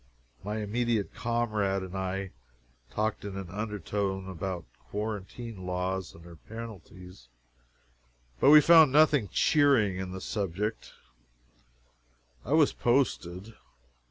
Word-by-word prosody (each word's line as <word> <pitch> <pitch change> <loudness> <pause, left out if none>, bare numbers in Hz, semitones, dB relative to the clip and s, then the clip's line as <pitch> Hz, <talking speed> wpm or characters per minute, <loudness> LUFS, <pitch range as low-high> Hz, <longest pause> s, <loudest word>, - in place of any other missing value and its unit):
My 105 +2 -3
immediate 110 0 -1
comrade 110 -5 -1
and 95 0 -8
I 95 0 -3 0.6
talked 110 0 -2
in 100 -1 -6
an 95 -3 -7
undertone 100 -2 -3
about 95 -1 -5 0.2
quarantine 105 0 -5
laws 90 +1 -3
and 85 - -14
their 85 -1 -13
penalties, 95 - -11 1.1
but - - +5
we 150 +1 +10
found 160 -3 +7
nothing 145 -7 +4
cheering 135 - +3
in 95 -1 -5
the 95 - -6
subject. 105 +2 -3 1.5
I 140 - -2
was 155 -2 +4
posted. 110 -5 0
100 Hz, 110 wpm, -29 LUFS, 95-115 Hz, 1.5 s, we